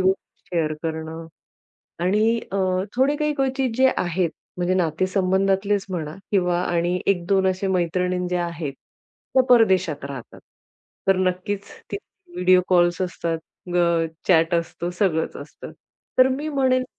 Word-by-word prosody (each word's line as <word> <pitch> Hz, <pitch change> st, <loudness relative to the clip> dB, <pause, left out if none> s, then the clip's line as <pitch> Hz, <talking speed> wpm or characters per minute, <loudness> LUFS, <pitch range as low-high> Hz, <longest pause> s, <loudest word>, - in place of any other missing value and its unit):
गोष्टी 185 Hz, -1 st, -2 dB
शेअर 155 Hz, -2 st, +1 dB
करणं. 160 Hz, 0 st, -4 dB, 0.8 s
आणि 220 Hz, +4 st, +2 dB
अ, -, -, 0 dB, 0.4 s
थोडे 275 Hz, +3 st, +3 dB
काही 300 Hz, -1 st, 0 dB
क्वचित 265 Hz, -2 st, 0 dB
जे 265 Hz, -, +5 dB
आहेत, 175 Hz, -1 st, 0 dB, 0.3 s
म्हणजे 180 Hz, +1 st, +1 dB
नातेसंबंधातलेच 190 Hz, +3 st, +1 dB
म्हणा, 160 Hz, -3 st, -4 dB, 0.2 s
किंवा 180 Hz, -3 st, +2 dB
आणि 175 Hz, +1 st, 0 dB
1-2 190 Hz, 0 st, +2 dB
अशा 185 Hz, +1 st, -1 dB
मैत्रिणी 180 Hz, 0 st, 0 dB
ज्या 180 Hz, -1 st, 0 dB
आहेत, 165 Hz, -4 st, -4 dB, 0.6 s
त्या 260 Hz, -, +6 dB
परदेशात 185 Hz, -11 st, +4 dB
राहतात. 135 Hz, -4 st, -8 dB, 0.7 s
तर 195 Hz, -, +5 dB
नक्कीच 185 Hz, +2 st, -1 dB, 0.3 s
त्यांचे 395 Hz, -3 st, -10 dB
व्हिडिओ 180 Hz, 0 st, +5 dB
कॉल्स 175 Hz, -1 st, +3 dB
असतात, 170 Hz, -2 st, -2 dB, 0.4 s
अ, 170 Hz, -1 st, +3 dB, 0.2 s
चॅट 165 Hz, -1 st, +4 dB
असतो, 170 Hz, +1 st, -2 dB
सगळंच 180 Hz, -3 st, 0 dB
असतं. -, -, -10 dB, 0.5 s
तर 255 Hz, -, +7 dB
मी 285 Hz, +4 st, -2 dB
म्हणेल, 260 Hz, -3 st, +2 dB
185 Hz, 130 wpm, -23 LUFS, 170-205 Hz, 0.8 s, तर